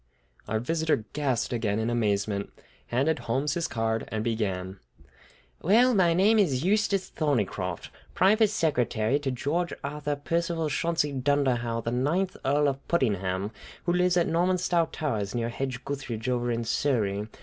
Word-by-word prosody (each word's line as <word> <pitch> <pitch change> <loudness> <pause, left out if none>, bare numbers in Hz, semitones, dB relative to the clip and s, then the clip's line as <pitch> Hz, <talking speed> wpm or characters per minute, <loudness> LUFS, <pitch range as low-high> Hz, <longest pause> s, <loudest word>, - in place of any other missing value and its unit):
Our 110 +1 0
visitor 160 -2 0
gasped 130 -4 -1
again 110 -3 0
in 110 +1 0
amazement, 105 -3 0 0.4
handed 140 +6 +1
Holmes 135 +5 -1
his 170 0 -1
card, 115 -1 -1
and 110 -1 -3
began: 95 -5 -2 0.8
"Well, 235 +8 +5
my 175 -5 +4
name 210 +5 +4
is 145 -9 +2
Eustace 200 0 +1
Thorneycroft, 105 - -1 0.2
private 210 +3 +4
secretary 130 - +1
to 145 -2 -2
George 150 +7 -1
Arthur 145 +1 -2
Percival 165 +2 -1
Chauncey 160 0 0
Dunderhaugh, 125 -4 0
the 115 - -2
ninth 155 +10 0
Earl 145 +2 +2
of 140 0 -3
Puddingham, 100 - 0 0.3
who 175 - +2
lives 180 0 +3
at 170 - +3
Normanstow 175 0 +2
Towers, 110 -9 -2
near 115 -1 -1
Hedge 130 +1 -4
gutheridge, 130 -5 -4
over 120 -1 0
in 115 0 -1
Surrey. 110 -5 0
135 Hz, 145 wpm, -27 LUFS, 115-165 Hz, 0.8 s, Well